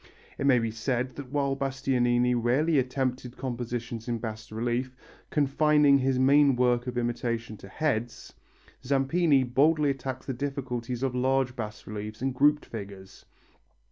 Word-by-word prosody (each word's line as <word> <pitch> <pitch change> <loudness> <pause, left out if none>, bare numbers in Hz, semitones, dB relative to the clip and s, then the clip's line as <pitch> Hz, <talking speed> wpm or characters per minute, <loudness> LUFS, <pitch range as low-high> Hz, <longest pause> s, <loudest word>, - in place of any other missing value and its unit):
It 140 - +1
may 130 -3 +6
be 115 -1 -1
said 120 +3 -1
also 145 - -8
that 130 -2 -13
while 140 -2 0
Bastianini 125 -3 +1
rarely 135 +6 +2
attempted 130 -1 -2
compositions 120 -2 -4
in 120 -1 -1
bas 110 -1 -7
relief, 120 +3 -2 0.3
confining 150 0 +4
his 130 0 +1
main 140 +1 +5
work 125 0 +1
of 125 -1 -4
imitation 120 -2 -2
to 95 - -12
heads, 120 0 -3 0.5
Zampini 140 +2 +2
boldly 145 +4 +3
attacks 130 -1 -5
the 135 - -3
difficulties 125 -2 -4
of 130 -2 0
large 130 0 +1
bas 105 -3 -6
reliefs 105 +1 -6
and 135 +1 -1
grouped 145 +3 +3
figures. 100 -3 -9
125 Hz, 145 wpm, -27 LUFS, 120-135 Hz, 0.5 s, may